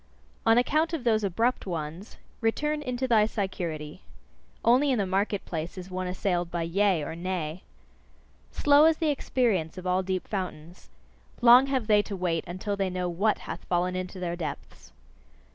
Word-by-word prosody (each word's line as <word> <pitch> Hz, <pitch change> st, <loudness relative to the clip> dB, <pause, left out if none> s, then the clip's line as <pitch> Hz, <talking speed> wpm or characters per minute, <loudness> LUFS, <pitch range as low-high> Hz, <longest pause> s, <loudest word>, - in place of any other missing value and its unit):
On 225 Hz, +1 st, +6 dB
account 310 Hz, +7 st, +2 dB
of 310 Hz, -6 st, -2 dB
those 220 Hz, -3 st, +2 dB
abrupt 225 Hz, +5 st, 0 dB
ones, 165 Hz, +3 st, -5 dB, 0.2 s
return 300 Hz, +6 st, 0 dB
into 255 Hz, -2 st, -2 dB
thy 220 Hz, -3 st, +4 dB
security: 175 Hz, -6 st, -4 dB, 0.6 s
only 255 Hz, +5 st, +4 dB
in 260 Hz, -, +2 dB
the 200 Hz, -, +1 dB
market 195 Hz, +2 st, -1 dB
place 165 Hz, +2 st, -5 dB
is 185 Hz, 0 st, -8 dB
one 185 Hz, 0 st, -3 dB
assailed 180 Hz, -1 st, -1 dB
by 170 Hz, -1 st, -2 dB
Yea? 180 Hz, -1 st, +1 dB
or 155 Hz, -, -5 dB
Nay? 175 Hz, -1 st, -4 dB, 0.9 s
Slow 290 Hz, +1 st, +5 dB
is 320 Hz, -1 st, +4 dB
the 315 Hz, -3 st, +1 dB
experience 220 Hz, -, 0 dB
of 185 Hz, -, -8 dB
all 180 Hz, +1 st, +2 dB
deep 185 Hz, -1 st, -3 dB
fountains: 175 Hz, -4 st, -6 dB, 0.5 s
long 245 Hz, +2 st, +7 dB
have 265 Hz, -4 st, 0 dB
they 210 Hz, -1 st, +4 dB
to 205 Hz, -1 st, -6 dB
wait 175 Hz, -3 st, -1 dB
until 185 Hz, +4 st, -3 dB
they 195 Hz, -1 st, -1 dB
know 180 Hz, 0 st, -2 dB
WHAT 195 Hz, +5 st, +1 dB
hath -, -, -6 dB
fallen 180 Hz, +1 st, 0 dB
into 185 Hz, +1 st, -5 dB
their 175 Hz, -1 st, -2 dB
depths. 170 Hz, -3 st, -7 dB
190 Hz, 170 wpm, -27 LUFS, 175-235 Hz, 0.9 s, long